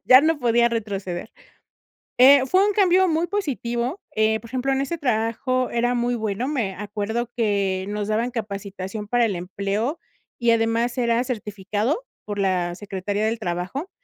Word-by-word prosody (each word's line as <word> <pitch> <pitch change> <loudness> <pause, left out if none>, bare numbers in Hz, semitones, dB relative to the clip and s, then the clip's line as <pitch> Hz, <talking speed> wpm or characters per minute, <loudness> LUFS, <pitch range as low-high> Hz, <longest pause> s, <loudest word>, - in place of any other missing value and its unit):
Ya 255 0 +8
no 315 +1 +2
podía 235 -2 +3
retroceder. 200 -4 -4 0.9
Eh, 270 +2 +8
fue 375 +8 +4
un 415 - +2
cambio 375 -2 +4
muy 325 +1 +1
positivo. 270 -6 -2
Eh, 220 0 +2
por 230 - -13
ejemplo, 260 +2 0
en 270 - +1
ese 335 +5 -3
trabajo 250 0 0
era 240 +1 +1
muy 240 0 0
bueno, 220 +2 -2
me 235 -10 -1
acuerdo 210 +3 -3
que 200 -4 0
nos 205 0 -3
daban 225 +3 0
capacitación 200 -2 -5
para 245 +1 +3
el 200 - -1
empleo 200 - -2 0.4
y 235 -1 +2
además 230 +2 +1
era 235 -1 +2
certificado 210 - -2 0.2
por 205 -1 -4
la 180 -3 0
Secretaría 200 +2 -3
del 225 +1 -1
Trabajo 185 - -4
230 Hz, 160 wpm, -23 LUFS, 205-255 Hz, 0.9 s, Ya